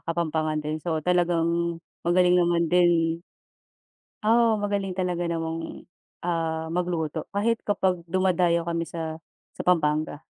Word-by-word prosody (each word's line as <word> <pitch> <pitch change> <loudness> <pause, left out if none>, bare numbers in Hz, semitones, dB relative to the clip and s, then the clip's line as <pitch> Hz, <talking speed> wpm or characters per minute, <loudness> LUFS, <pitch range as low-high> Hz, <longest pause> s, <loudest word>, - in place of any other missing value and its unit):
kapampangan 160 -2 0
din 155 +1 -3
so 160 -2 -1
talagang 170 -1 +1 0.2
magaling 180 +1 +4
naman 170 -1 +3
din. 170 -1 +3 1.0
Oo, 230 0 +4
magaling 200 -2 -2
talaga 175 -2 -1
namang, 165 0 -4 0.4
ah, 160 -2 -2
magluto 165 -3 -2
kahit 225 +3 +1
kapag 190 -3 +1
dumadayo 175 -1 +2
kami 170 0 -2
sa 160 0 -5 0.3
sa - - -6
Pampanga. 155 -3 +1
170 Hz, 115 wpm, -25 LUFS, 165-180 Hz, 1.0 s, magaling